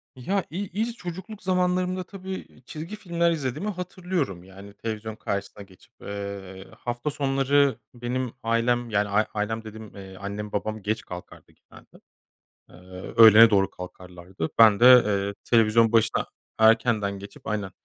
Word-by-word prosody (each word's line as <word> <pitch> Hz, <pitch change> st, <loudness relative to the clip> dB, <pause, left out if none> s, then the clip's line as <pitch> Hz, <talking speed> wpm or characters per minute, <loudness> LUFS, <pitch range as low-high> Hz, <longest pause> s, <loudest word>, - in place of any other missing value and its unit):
Ya 190 Hz, +9 st, -1 dB
i 165 Hz, -, -7 dB
i 195 Hz, -, -8 dB
ilk 235 Hz, +1 st, -2 dB
çocukluk 190 Hz, +5 st, -8 dB
zamanlarımda 185 Hz, 0 st, 0 dB
tabii 190 Hz, 0 st, -8 dB, 0.2 s
çizgi 165 Hz, +7 st, -7 dB
filmler 170 Hz, -4 st, 0 dB
izlediğimi 150 Hz, -, -3 dB
hatırlıyorum 180 Hz, -, -4 dB
yani 100 Hz, +2 st, -13 dB
televizyon 110 Hz, 0 st, -5 dB
karşısına 100 Hz, 0 st, -5 dB
geçip, 95 Hz, -2 st, -21 dB
eee, 100 Hz, -2 st, -7 dB
hafta 120 Hz, +4 st, -3 dB
sonları 140 Hz, -1 st, +1 dB
benim 125 Hz, 0 st, -3 dB
ailem 115 Hz, +1 st, +1 dB
yani 105 Hz, -1 st, +1 dB, 0.3 s
ailem 110 Hz, +1 st, -2 dB
dediğim, 110 Hz, -1 st, -11 dB
eee, 95 Hz, -1 st, -10 dB
annem 100 Hz, +1 st, -6 dB
babam 110 Hz, +1 st, -3 dB
geç 110 Hz, +3 st, -2 dB
kalkardı 90 Hz, 0 st, -11 dB
genelde. -, -, -19 dB, 0.7 s
Eee, -, -, -17 dB, 0.4 s
öğlene 115 Hz, 0 st, +9 dB
doğru 95 Hz, -2 st, +3 dB
kalkarlardı. 90 Hz, -1 st, -8 dB
Ben 110 Hz, -2 st, +7 dB
de, 120 Hz, -, +5 dB, 0.2 s
eee, 100 Hz, -1 st, -1 dB
televizyon 115 Hz, 0 st, +4 dB
başına 115 Hz, -1 st, +2 dB, 0.3 s
erkenden 110 Hz, -3 st, +3 dB
geçip 100 Hz, -, -12 dB
aynen 105 Hz, -3 st, -3 dB
115 Hz, 140 wpm, -25 LUFS, 100-150 Hz, 0.7 s, öğlene